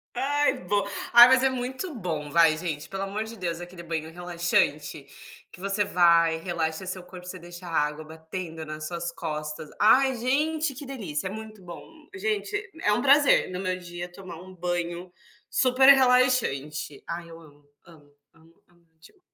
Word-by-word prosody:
Ai 290 Hz, +3 st, +1 dB
bo 205 Hz, +2 st, +1 dB, 0.3 s
ai, 240 Hz, +1 st, +10 dB
mas 260 Hz, 0 st, +5 dB
é -, -, +5 dB
muito 260 Hz, +6 st, -4 dB
bom, 160 Hz, -8 st, -4 dB
vai 165 Hz, -2 st, +5 dB
gente, 160 Hz, -3 st, -4 dB
pelo 195 Hz, 0 st, -4 dB
amor 200 Hz, +2 st, -3 dB
de 230 Hz, +1 st, -9 dB
Deus, 175 Hz, -3 st, -4 dB
aquele 175 Hz, 0 st, -9 dB
banho 160 Hz, -1 st, -4 dB
relaxante, 170 Hz, -4 st, -1 dB, 0.5 s
que 180 Hz, -, -13 dB
você 200 Hz, +1 st, 0 dB
vai 170 Hz, -3 st, +4 dB
e -, -, -6 dB
relaxa 165 Hz, -1 st, -3 dB
o -, -, -10 dB
seu 185 Hz, 0 st, -5 dB
corpo, 180 Hz, 0 st, -12 dB
você 185 Hz, 0 st, -7 dB
deixa 175 Hz, +1 st, -11 dB
a 165 Hz, -, 0 dB
água 150 Hz, +1 st, -1 dB
batendo 160 Hz, +1 st, -7 dB
nas 155 Hz, 0 st, -6 dB
suas 170 Hz, 0 st, -4 dB
costas. 155 Hz, -2 st, -5 dB
Ai, 260 Hz, +4 st, +5 dB
gente, 295 Hz, +4 st, 0 dB
que 285 Hz, +2 st, -9 dB
delícia. 200 Hz, -, -4 dB
É -, -, -7 dB
muito 215 Hz, -1 st, -9 dB
bom. 175 Hz, -1 st, -9 dB, 0.3 s
Gente 415 Hz, +1 st, -2 dB, 0.3 s
é 210 Hz, -, +3 dB
um -, -, +1 dB
prazer, 280 Hz, -4 st, +5 dB
no 180 Hz, -, -4 dB
meu 185 Hz, -1 st, -2 dB
dia 175 Hz, 0 st, -8 dB
tomar 175 Hz, -2 st, -10 dB
um 185 Hz, 0 st, -13 dB
banho 175 Hz, 0 st, -3 dB, 0.4 s
super 260 Hz, +1 st, +4 dB
relaxante. 250 Hz, -, +3 dB
Ai, 170 Hz, 0 st, -6 dB
eu 165 Hz, -, -11 dB
amo, 145 Hz, -2 st, -19 dB, 0.2 s
amo, 150 Hz, -4 st, -18 dB, 0.2 s
amo, 165 Hz, 0 st, -23 dB
amo 175 Hz, -1 st, -29 dB
demais 385 Hz, -, -19 dB
180 Hz, 180 wpm, -26 LUFS, 165-235 Hz, 0.5 s, ai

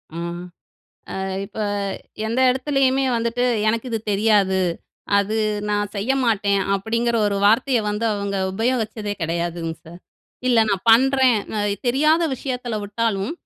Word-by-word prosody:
ஆ. -, -, -5 dB, 1.0 s
அ -, -, -3 dB, 0.2 s
இப்ப 215 Hz, +2 st, -10 dB, 0.7 s
எந்த 230 Hz, +4 st, 0 dB
இடத்துலேயுமே 270 Hz, 0 st, +1 dB
வந்துட்டு, 235 Hz, +1 st, -1 dB, 0.2 s
"எனக்கு 230 Hz, +3 st, -1 dB
இது 225 Hz, -, -1 dB
தெரியாது, 200 Hz, -2 st, +3 dB, 0.6 s
அது 205 Hz, +2 st, 0 dB, 0.3 s
நான் 205 Hz, 0 st, -1 dB
செய்ய 210 Hz, +7 st, 0 dB
மாட்டேன்." 200 Hz, -3 st, +1 dB
அப்படீங்கிற 230 Hz, +4 st, -1 dB
ஒரு 200 Hz, -1 st, 0 dB
வார்த்தைய 240 Hz, +3 st, +3 dB
வந்து 210 Hz, +2 st, -2 dB
அவங்க 200 Hz, -1 st, -3 dB, 0.2 s
உபயோகிச்சதே 220 Hz, -1 st, -1 dB
கெடையாதுங்க 170 Hz, 0 st, -2 dB
சார். 170 Hz, +2 st, -12 dB, 0.5 s
"இல்ல, 240 Hz, -2 st, +4 dB
நான் 195 Hz, -2 st, -1 dB
பண்ணுறேன்" 260 Hz, 0 st, +5 dB, 0.2 s
அ -, -, +1 dB, 0.3 s
தெரியாத 305 Hz, +6 st, +3 dB
விஷயத்தில 250 Hz, -3 st, -4 dB
விட்டாலும், 205 Hz, +1 st, -1 dB
220 Hz, 125 wpm, -21 LUFS, 200-245 Hz, 1.0 s, பண்ணுறேன்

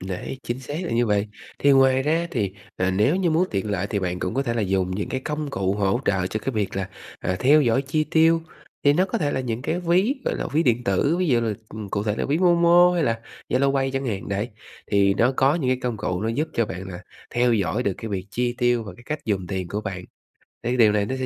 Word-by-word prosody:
Đấy, 95 Hz, +7 st, -5 dB
chính 120 Hz, +2 st, -4 dB
xác 140 Hz, +3 st, -7 dB
là -, -, -3 dB
như 120 Hz, +1 st, +2 dB
vậy. 105 Hz, -1 st, +1 dB, 0.3 s
Thì 140 Hz, -, +4 dB
ngoài 135 Hz, -1 st, +5 dB
ra 160 Hz, +4 st, +1 dB
thì, 100 Hz, -6 st, -1 dB, 0.2 s
ờ, 95 Hz, 0 st, +1 dB
nếu 105 Hz, -, +2 dB
như 185 Hz, -3 st, +1 dB
muốn 165 Hz, +4 st, +2 dB
tiện 100 Hz, +1 st, -2 dB
lợi 100 Hz, -1 st, -1 dB
thì 100 Hz, -, -2 dB
bạn 90 Hz, -2 st, -2 dB
cũng 110 Hz, -, -3 dB
có 135 Hz, -, +1 dB
thể 120 Hz, -4 st, -2 dB
là 115 Hz, -, 0 dB
dùng 95 Hz, -1 st, 0 dB
những 95 Hz, +3 st, -3 dB
cái 130 Hz, -, -2 dB
công 150 Hz, -1 st, -3 dB
cụ 95 Hz, -7 st, 0 dB
hỗ 100 Hz, +3 st, +1 dB
trợ 95 Hz, -2 st, +1 dB
cho 110 Hz, +3 st, -3 dB
cái 135 Hz, -, -2 dB
việc 105 Hz, -3 st, -1 dB
là, 95 Hz, -1 st, -2 dB, 0.3 s
à, 90 Hz, -, -2 dB
theo 145 Hz, +4 st, +6 dB
dõi 120 Hz, +2 st, +2 dB
chi 155 Hz, +3 st, 0 dB
tiêu. 165 Hz, +1 st, +3 dB, 0.4 s
Thì 145 Hz, -, +5 dB
nó 180 Hz, +5 st, +3 dB
có 185 Hz, -, -2 dB
thể 145 Hz, -3 st, 0 dB
là -, -, -1 dB
những 120 Hz, -1 st, -3 dB
cái 170 Hz, +4 st, -1 dB
ví, 180 Hz, +9 st, +2 dB
gọi -, -, 0 dB
là, -, -, -3 dB
ví 155 Hz, +3 st, +3 dB
điện 120 Hz, -3 st, +1 dB
tử, 130 Hz, -, +2 dB
ví 185 Hz, -, +1 dB
dụ 120 Hz, -4 st, +3 dB
là, 115 Hz, -2 st, 0 dB, 0.2 s
ừm, 105 Hz, -2 st, -7 dB
cụ 100 Hz, +1 st, -1 dB
thể 105 Hz, 0 st, -1 dB
là -, -, -1 dB
ví 145 Hz, +3 st, +1 dB
Momo 175 Hz, 0 st, +5 dB
hay 175 Hz, -, +1 dB
là 115 Hz, -1 st, 0 dB, 0.3 s
Zalo 140 Hz, +2 st, +2 dB
Pay 135 Hz, 0 st, +1 dB
chẳng 135 Hz, 0 st, -2 dB
hạn, 100 Hz, -5 st, -3 dB
đấy. 100 Hz, +3 st, -2 dB, 0.4 s
Thì 100 Hz, -1 st, +3 dB
nó 120 Hz, +5 st, +3 dB
có 135 Hz, +2 st, +4 dB
những 140 Hz, -7 st, 0 dB
cái 130 Hz, -, +1 dB
công 120 Hz, -3 st, -1 dB
cụ 90 Hz, -3 st, -2 dB
nó 110 Hz, -, 0 dB
giúp 145 Hz, +8 st, -1 dB
cho 115 Hz, -, +1 dB
bạn 95 Hz, 0 st, -6 dB
là 90 Hz, -2 st, -8 dB, 0.3 s
theo 120 Hz, 0 st, +2 dB
dõi 110 Hz, +2 st, 0 dB
được 100 Hz, -, 0 dB
cái 115 Hz, -, -5 dB
việc 95 Hz, -2 st, -4 dB
chi 120 Hz, +3 st, -1 dB
tiêu 120 Hz, -1 st, +2 dB
và 105 Hz, -, -8 dB
cái 120 Hz, -, -15 dB
cách 155 Hz, 0 st, -2 dB
dùng 100 Hz, -5 st, -1 dB
tiền 95 Hz, -2 st, -3 dB
của 105 Hz, -, -3 dB
bạn. 95 Hz, -4 st, -5 dB, 0.6 s
Thì 120 Hz, +2 st, 0 dB
điều 110 Hz, -3 st, +6 dB
này 105 Hz, -1 st, +1 dB
nó 130 Hz, -, -3 dB
sẽ 130 Hz, -, -1 dB
120 Hz, 275 wpm, -23 LUFS, 100-140 Hz, 0.6 s, theo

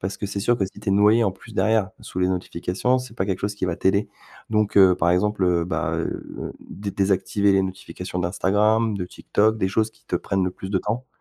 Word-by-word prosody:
Parce 95 Hz, +2 st, -3 dB
que 100 Hz, -, -3 dB
c'est 100 Hz, 0 st, -4 dB
sûr 120 Hz, +4 st, +2 dB
que 95 Hz, -, +2 dB
si 95 Hz, -, -13 dB
tu 105 Hz, -, -5 dB
es 95 Hz, -, +3 dB
noyé 105 Hz, +3 st, +5 dB
en 100 Hz, -, +2 dB
plus 115 Hz, -, -15 dB
derrière, 110 Hz, -2 st, +2 dB
sous 90 Hz, -, -7 dB
les 90 Hz, -, +3 dB
notifications, 95 Hz, +6 st, -1 dB
c'est 125 Hz, -3 st, -8 dB
pas 95 Hz, -, -1 dB
quelque 95 Hz, -3 st, -1 dB
chose 105 Hz, +1 st, -2 dB
qui 100 Hz, -, -3 dB
va 90 Hz, -2 st, -1 dB
t'aider. 100 Hz, +2 st, +1 dB, 0.4 s
Donc, 105 Hz, -1 st, +1 dB
heu, 95 Hz, -2 st, +7 dB
par 85 Hz, 0 st, +2 dB
exemple, 105 Hz, +2 st, +1 dB
heu, 85 Hz, -2 st, +2 dB
bah, 90 Hz, -, -1 dB
heu, -, -, -3 dB, 0.4 s
dé 100 Hz, 0 st, -5 dB
désactiver 100 Hz, +1 st, +1 dB
les 95 Hz, 0 st, +3 dB
notifications 95 Hz, -1 st, -5 dB
d'Instagram, 105 Hz, +5 st, +2 dB
de 90 Hz, -, -3 dB
TikTok, 110 Hz, +4 st, 0 dB
des 95 Hz, -3 st, 0 dB
choses 110 Hz, +3 st, +1 dB
qui 110 Hz, -, -29 dB
te -, -, 0 dB
prennent 95 Hz, -1 st, -1 dB
le 90 Hz, -, 0 dB
plus 95 Hz, +1 st, -8 dB
de 95 Hz, -, +2 dB
temps. 120 Hz, +7 st, -3 dB
100 Hz, 240 wpm, -23 LUFS, 95-105 Hz, 0.4 s, heu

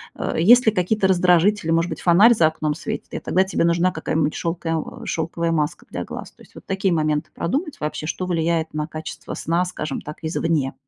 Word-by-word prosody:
э, -, -, -3 dB
есть 240 Hz, +9 st, +6 dB
ли 220 Hz, -, +5 dB
какие-то 190 Hz, +2 st, +1 dB
раздражители. 180 Hz, 0 st, +3 dB
Может 165 Hz, +1 st, +2 dB
быть, -, -, -6 dB
фонарь 195 Hz, +7 st, +6 dB
за 160 Hz, -6 st, +4 dB
окном 155 Hz, -1 st, -2 dB
светит, -, -, -6 dB
и -, -, -3 dB
тогда 185 Hz, -, +2 dB
тебе 190 Hz, -, 0 dB
нужна 170 Hz, +2 st, +2 dB
какая-нибудь 160 Hz, -2 st, -1 dB
шелкоя 165 Hz, -1 st, -2 dB, 0.3 s
шелковая 165 Hz, +1 st, -2 dB
маска 150 Hz, -2 st, -1 dB
для -, -, -4 dB
глаз. -, -, -8 dB
То -, -, -23 dB
есть -, -, -22 dB
вот -, -, -12 dB
такие 195 Hz, -1 st, 0 dB
моменты 155 Hz, -2 st, 0 dB
продумать 290 Hz, -, -2 dB
вообще, 155 Hz, 0 st, -4 dB
что 185 Hz, +3 st, -3 dB
влияет 165 Hz, -2 st, 0 dB
на 150 Hz, 0 st, -2 dB
качество 155 Hz, 0 st, -7 dB
сна, 170 Hz, +2 st, 0 dB
скажем 155 Hz, -3 st, -4 dB
так, 150 Hz, -, -8 dB
извне. 160 Hz, -4 st, 0 dB
170 Hz, 200 wpm, -22 LUFS, 160-185 Hz, 0.3 s, есть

